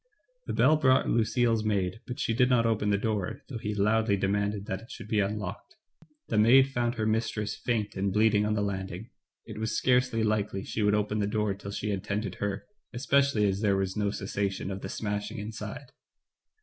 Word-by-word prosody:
The - - -2
bell 155 - +4
brought 130 -3 +3
Lucille's 115 0 +2
maid, 100 -1 -1
but 125 +3 -6
she 115 - 0
did 125 +2 +3
not 120 -2 +3
open 110 -2 +1
the 100 - +3
door, 105 -3 -2
though 125 -5 -6
he 105 -1 -3
loudly 105 0 +2
demanded 100 +1 -1
that 95 -1 -4
it 115 - -15
should - - -9
be 105 0 +1
unlocked. 100 - -3 0.5
The 105 - +2
maid 130 +5 +6
found 120 -2 -1
her 110 -2 -1
mistress 110 -1 -1
faint 110 -4 -2
and 100 0 0
bleeding 105 0 +3
on 105 0 0
the 105 - 0
landing; 95 +2 -4 0.3
it 110 -2 -8
was 110 +1 -1
scarcely 125 -3 +2
likely 105 -2 0
she 110 - -3
would 105 0 +3
open 105 0 0
the 100 - +1
door 105 -1 0
till 100 0 -9
she 105 +1 -3
had 95 -2 -3
tended 100 -1 -2
her, 100 0 -2 0.3
especially 135 -2 +2
as 100 0 0
there 100 -3 +2
was 95 -1 -1
no 105 -1 0
cessation 100 -1 -3
of 95 +1 -5
the - - -5
smashing 105 +1 -3
inside. 110 +6 -7
105 Hz, 200 wpm, -28 LUFS, 100-115 Hz, 0.5 s, maid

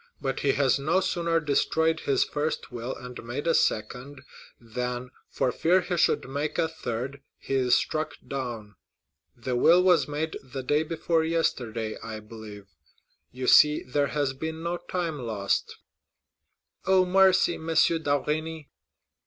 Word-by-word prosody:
But 135 -2 -2
he 140 -1 +2
has 135 -1 +2
no 160 +7 +2
sooner 170 -3 0
destroyed 160 +2 +1
his 140 -4 +2
first 150 0 -3
will 120 +1 -5
and 125 -1 -9
made 120 +6 -5
a 165 - +3
second, 125 +5 -1 0.4
than, 125 +2 -4 0.2
for 125 - 0
fear 180 +7 +3
he 180 0 -3
should 165 - +2
make 145 +3 -3
a 165 - +2
third, 135 -3 -5 0.2
he - - -6
is 125 -2 +3
struck 155 0 -1
down. 120 -7 -5 0.6
The 125 +2 -3
will 170 +8 +5
was 180 -5 +4
made 150 +2 -3
the 130 0 -7
day 145 +4 +2
before 160 0 0
yesterday, 120 -9 -1
I 110 -1 -6
believe; 105 -2 -11 0.7
you 130 +1 -5
see 150 +3 +6
there 140 +3 0
has 145 -3 -1
been 160 +4 -5
no 170 +1 -1
time 170 -4 -3
lost." 110 -5 -2 1.1
"Oh, 190 -1 +5
mercy, 190 -1 +4
M. 160 - -8
d'Avrigny!" 155 -1 0
145 Hz, 145 wpm, -27 LUFS, 125-160 Hz, 1.1 s, see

